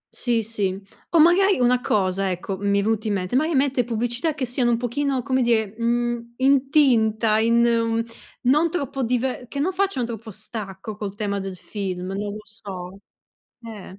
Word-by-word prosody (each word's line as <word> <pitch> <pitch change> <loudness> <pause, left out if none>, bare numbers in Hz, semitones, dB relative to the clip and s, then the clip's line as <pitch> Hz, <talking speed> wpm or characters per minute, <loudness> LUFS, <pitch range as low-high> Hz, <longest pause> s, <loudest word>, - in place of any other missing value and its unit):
Sì, 235 -2 +1
sì, 200 -4 -1 0.3
o 335 - +3
magari 375 +5 +5
una 250 0 +3
cosa, 195 -3 +1
ecco, 185 +2 -3
mi 200 0 +1
è - - 0
venuto 220 0 0
in 210 - 0
mente. 185 +3 -2
Mai 310 +4 +2
mette 265 -2 +2
pubblicità 240 +6 -1
che 270 - -2
siano 245 0 +1
un 235 - +2
pochino, 255 +2 -1
come 260 0 +1
dire, 220 -4 +1
mhmm, 235 0 -1
in 270 +1 +3
tinta, 225 -6 +3
in 230 +1 +4
uhm, 230 -1 +1 0.4
non 300 +7 +3
troppo 280 -5 -3
dive 250 +1 -1
che 280 - -8
non 330 +7 +1
facciano 375 -9 0
troppo 225 -1 -7
stacco 210 -1 -7
col 205 -2 -5
tema 200 -1 -2
del 195 -1 -5
film, 185 -1 -5
non 205 +1 -3
lo 215 - -8
so, 195 -3 -9 0.7
eh. 200 -3 -10
230 Hz, 180 wpm, -23 LUFS, 205-260 Hz, 0.7 s, magari